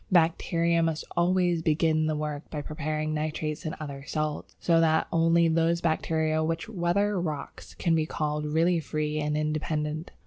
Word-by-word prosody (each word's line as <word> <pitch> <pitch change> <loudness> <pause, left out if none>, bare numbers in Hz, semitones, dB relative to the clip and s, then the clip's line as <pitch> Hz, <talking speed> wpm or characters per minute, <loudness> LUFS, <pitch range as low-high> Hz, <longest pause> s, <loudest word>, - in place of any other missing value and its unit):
Bacteria 170 0 +3
must 165 -1 0
always 175 -1 +2
begin 155 0 +2
the 155 - 0
work 150 0 -4
by 150 -1 -4
preparing 155 0 -3
nitrates 155 0 -3
and 155 - -3
other 140 -3 -6
salts. 155 -1 -3
So 165 -1 +3
that 160 -1 +3
only 165 0 +4
those 165 +1 +2
bacteria 160 -1 0
which 165 +4 -2
weather 200 0 0
rocks 155 -5 -6
can 170 - +1
be 160 -1 +2
called 150 -1 -2
really 165 +3 +2
free 155 0 -2
and 150 0 -1
independent. 155 +1 -2
160 Hz, 160 wpm, -27 LUFS, 155-170 Hz, -, only